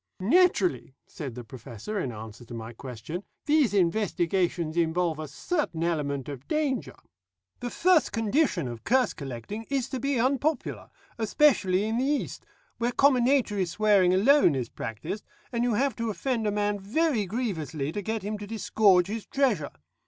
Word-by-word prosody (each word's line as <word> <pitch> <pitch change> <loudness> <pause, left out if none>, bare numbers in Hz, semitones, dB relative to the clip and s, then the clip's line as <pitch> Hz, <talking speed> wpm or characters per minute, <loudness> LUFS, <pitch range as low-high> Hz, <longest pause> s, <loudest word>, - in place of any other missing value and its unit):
"Naturally," 355 - +2
said 135 -7 -7
the 125 - -7
Professor 120 - -6
in 135 -9 -2
answer 110 +1 -9
to 120 - -9
my 115 +1 -7
question, 130 - -7 0.2
"these 300 -4 +3
investigations 175 -3 +1
involve 170 -1 +1
a 155 - -4
certain 170 - -2
element 145 -5 -1
of 140 -2 -8
danger. 295 -5 -1 0.6
The 245 - -4
first 345 +1 +3
condition 225 - +1
of 120 -2 -7
curse 255 +2 +2
collecting 140 - -7
is 270 -2 -1
to 260 - -3
be 275 0 0
unpopular, 275 +3 0 0.3
especially 210 -5 +3
in 220 +2 -1
the - - +1
East, 290 0 -2 0.3
where 240 +1 +1
comminatory 250 -7 +3
swearing 200 0 +3
alone 205 - +5
is 125 -3 -2
practised, 160 - -5 0.3
and 235 -1 0
you 240 -3 +1
have 265 0 +1
to 230 -1 -2
offend 230 0 -1
a - - +1
man 205 0 0
very 225 - 0
grievously 160 - -3
to 205 - -3
get 220 +1 -3
him 210 +1 -3
to 205 - -7
disgorge 205 -4 +3
his 215 +3 -5
treasure. 230 - +1
205 Hz, 160 wpm, -27 LUFS, 160-250 Hz, 0.6 s, alone